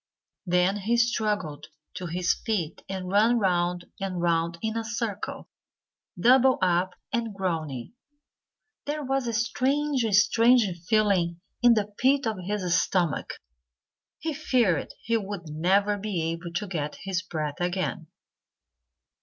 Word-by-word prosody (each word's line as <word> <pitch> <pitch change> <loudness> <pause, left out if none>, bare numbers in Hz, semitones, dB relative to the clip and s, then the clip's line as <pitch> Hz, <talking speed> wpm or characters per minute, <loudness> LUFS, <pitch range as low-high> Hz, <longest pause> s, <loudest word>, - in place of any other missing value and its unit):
Then 180 +3 +2
he 220 +4 0
struggled 210 -10 0 0.3
to 180 - -5
his 175 +2 +1
feet 195 -9 -3
and 185 -1 -4
ran 220 +4 +4
round 175 -3 +1
and 190 -2 -3
round 170 0 +1
in 220 0 -1
a 230 - -1
circle, 225 -2 -4 0.7
doubled 260 +2 +5
up 180 0 +1 0.2
and 230 -3 -1
groaning. 165 - -3 0.9
There 300 +1 -2
was 270 -2 -1
a 235 - -1
strange, 265 +4 +1
strange 230 +4 +5 0.3
feeling 190 -6 +2 0.2
in 240 -1 +6
the 210 -1 -1
pit 270 +2 +3
of 220 -4 -2
his 185 -2 +1
stomach. 175 -7 0 0.9
He 320 0 -3
feared 245 - +1 0.2
he 230 +1 +1
would 195 -6 -6
never 195 +7 +2
be 195 -5 -2
able 165 +1 -6
to 185 +5 -2
get 155 -5 -3
his 190 -2 -1
breath 155 -5 -4
again. 180 -1 -2
195 Hz, 130 wpm, -26 LUFS, 175-230 Hz, 0.9 s, in